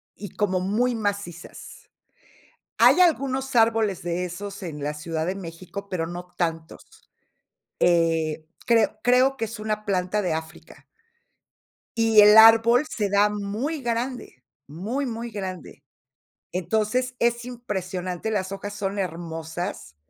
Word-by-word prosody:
y 205 - -8
como 190 -3 0
muy 230 +6 0
macizas. 200 -4 -6 0.9
Hay 250 +9 +6
algunos 270 -6 +1
árboles 225 -4 +3
de 175 +1 -2
esos 195 +3 -7
en 150 -5 -6
la 150 +1 -2
Ciudad 160 +1 -4
de 185 +3 -2
México, 185 +2 -8
pero 165 -3 -2
no 175 +1 -7
tantos. 165 -2 -5 0.7
Eh, 165 -2 +2 0.2
creo 230 -3 +2
creo 255 +2 +4
que 225 - -1
es 225 0 -8
una 215 0 -3
planta 195 +1 0
de 180 -4 -1
África. 160 0 -8 1.1
Y 225 -2 +5
el 210 +1 +8
árbol, 225 +4 +7
se 205 -3 -2
da 205 +1 +4
muy 210 +9 -3
grande. 240 - -4 0.2
Muy, 215 - -4
muy 235 0 -5
grande. 190 -4 -7 0.7
Entonces, 220 +7 -1
es 235 0 +1
impresionante, 190 -5 -4
las 190 -2 -2
hojas 205 +1 -6
son 200 -1 -3
hermosas 165 - -5
205 Hz, 130 wpm, -24 LUFS, 175-230 Hz, 1.1 s, el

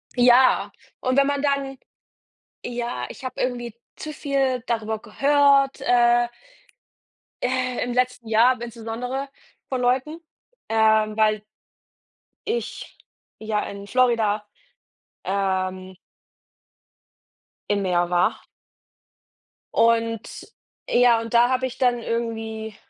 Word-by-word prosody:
Ja. 250 +1 +5 0.3
Und 255 0 -1
wenn 280 0 +5
man 285 -1 -1
dann 280 -2 -1 0.9
ja, 240 0 -4
ich - - -11
habe 255 - -6
irgendwie 240 -2 -3 0.2
zu 310 - -7
viel 270 -4 -1
darüber 220 -2 -2
gehört, 280 0 +3
äh 240 0 +3 1.2
äh, 255 0 -1
im 245 0 -3
letzten 250 -1 -1
Jahr 225 +3 +5
aber 250 -2 -4
insbesondere 240 +4 -5 0.4
von 260 -2 -2
Leuten, 260 +6 0 0.5
ähm, 220 -1 +3
weil 215 -1 +2 1.0
ich 465 +2 -4 0.4
ja 215 -1 -1
in 200 0 -8
Florida, 230 -4 +2 0.8
ähm 185 -1 -2 1.7
im 205 -1 +1
Meer 175 -2 +1
war. 175 0 +1 1.3
Und 230 -1 0 0.4
ja, 240 -2 +4
und 230 0 -7
da 240 +1 +5
habe 260 0 0
ich 260 0 -6
dann 245 -2 +2
irgendwie 225 -2 -4
240 Hz, 105 wpm, -23 LUFS, 220-255 Hz, 1.7 s, Ja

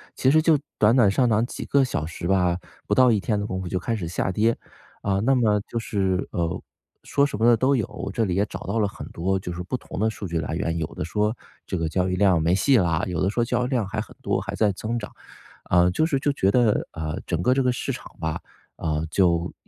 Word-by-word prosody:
其 130 - +2
实 155 - +5
就 155 -1 +4 0.2
短 110 +3 +4
短 115 -6 +5
上 125 +5 +2
涨 110 +1 +3
几 - - -6
个 140 -1 +3
小 80 - -2
时 85 +1 -5
吧， 90 -2 +2 0.3
不 - - +1
到 130 -1 +6
一 110 - +2
天 105 +1 -1
的 100 - -2
功 95 -2 -3
夫 95 - -5
就 90 +1 -1
开 115 -2 -2
始 90 -6 -4
下 90 +2 -1
跌， 110 +4 +2 0.5
啊， 95 -1 0
那 130 +5 +3
么 105 -4 +3
就 - - -5
是， 95 -4 -1
呃， 85 -1 -2 0.4
说 140 - +2
什 140 -7 -3
么 115 - +3
的 120 -1 +6
都 135 +4 +3
有， 105 -4 -3
这 115 - +1
里 90 - -1
也 100 +2 +2
找 - - -7
到 115 - -2
了 105 - +2
很 - - -9
多 95 +3 0
就 90 -2 -5
是 85 - -5
不 95 - -3
同 95 - -8
的 110 +2 +2
数 105 - -7
据 85 -1 -2
来 80 +1 -3
源， 85 -2 -1
有 80 - -1
的 - - -3
说 105 +5 0 0.3
这 95 - -2
个 80 -1 -1
交 90 +2 0
易 90 - 0
量 95 -4 +3
没 85 +3 +2
戏 130 +7 +4
啦， 85 -4 +1
有 90 - -2
的 95 - +2
说 120 +3 0
交 125 - 0
易 - - -3
量 125 -6 0
还 110 +2 -3
很 110 - -11
多， - - 0
还 - - -5
在 105 -2 +2
增 110 +5 -3
长。 105 - -8 0.6
呃， 90 0 +4
就 155 - +1
是 145 -4 0
就 145 +1 +1
觉 95 -8 +2
得， 120 -3 +2
呃， 80 -1 -4
整 85 -1 -1
个 125 - +4
这 135 - +2
个 125 - +3
市 125 - -3
场 - - -9
吧， 80 -1 -3 0.4
啊， 80 -1 -1
就 85 -2 +2
100 Hz, 285 characters per minute, -24 LUFS, 90-115 Hz, 0.6 s, 到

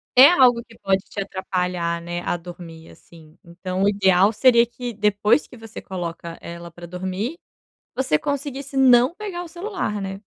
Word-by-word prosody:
é 260 +2 +10
algo 245 -7 +4
que 225 -1 -19
pode 195 -1 +1
te - - -8
atrapalhar, 180 -3 -2
né, 175 +1 -5
a - - -1
dormir, 170 -2 -11
assim. 160 -1 -18
Então, 185 +2 -4
o 200 - +4
ideal 195 0 +4
seria 235 +1 +5
que 240 0 -7
depois 210 +4 +2
que - - -14
você 225 -1 -10
coloca 170 -2 -6
ela 170 0 -9
pra 175 0 -11
dormir, 185 - -4 0.6
você 250 - +1
conseguisse 280 - -4
não 255 +1 +5
pegar 380 -4 -5
o - - -9
celular, 345 - -4
né. 195 0 -5
200 Hz, 170 wpm, -22 LUFS, 175-250 Hz, 0.6 s, é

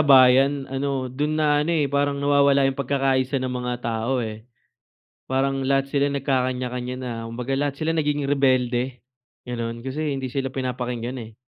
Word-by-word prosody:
bayan 135 0 +6
ano, 135 -2 -2
dun 150 +3 -1
na 150 -1 +3
ano, 150 - -1
eh, 155 -3 +2
parang 140 +1 0
nawawala 140 -1 +4
yung 135 0 +2
pagkakaisa 135 0 +1
ng 130 -1 -3
mga 125 0 -2
tao, 115 +2 -1
eh. 110 +2 -8 0.8
Parang 135 +1 0
lahat 135 0 +1
sila 140 0 +1
nagkakanya-kanya 125 -2 -1
na. 125 -1 -4
Kumbaga, 120 +3 -3
lahat 140 0 -2
sila 165 +1 0
nagiging 145 -2 0
rebelde, 130 -2 +1 0.5
gano'n 115 -1 -4
kasi 140 +4 -3
hindi 135 -1 -3
sila 135 0 -3
pinapakinggan, 125 -1 -3
eh. 110 0 -14
135 Hz, 155 wpm, -24 LUFS, 125-140 Hz, 0.8 s, bayan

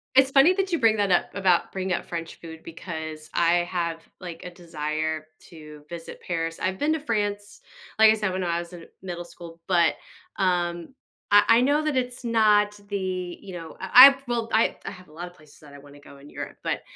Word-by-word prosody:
It's 265 0 +6
funny 275 +6 +6
that 385 -1 -1
you 335 - +1
bring 225 -2 +3
that 205 -1 +1
up 175 - +1
about 190 -3 +2
bringing 190 -1 -2
up - - -6
French 165 -1 -6
food, 160 -1 -11
because 160 -2 -8
I 170 +1 +3
have, 170 -2 -3 0.2
like, 175 -3 -9
a - - -7
desire 155 -2 -4 0.2
to 150 -2 -13
visit 170 0 -9
Paris, 165 -1 -4
I've 190 0 -1
been 295 +7 0
to 320 - -2
France, 205 -6 -3 0.4
like 220 0 +7
I - - +2
said, 210 -4 -2
when 185 0 -2
I 170 -1 -1
was 170 +1 -9
in 170 -1 -10 0.2
middle 175 -2 -6
school, 170 -1 -13
but, 170 -3 +3 0.4
um, 175 +2 -1 0.4
I 205 0 +7
I 230 +1 +5
know 285 +4 +2
that 305 -2 0
it's 250 -1 -3
not 210 -2 +3
the 185 -3 -4
you 190 - -10
know, 165 -2 -9
I 190 - -5
I - - +14
have 270 0 -11
well, 235 -2 -2
I 220 - +2
I - - -4
have 185 -2 -14
a 150 - -19
lot 175 +3 -7
of 175 - -14
places 155 -3 -20
that 145 -2 -15
I - - -11
wanna 145 0 -16
go 140 - -15
in 140 +1 -15
Europe, - - -8
but - - -2
180 Hz, 225 wpm, -25 LUFS, 165-210 Hz, 0.4 s, I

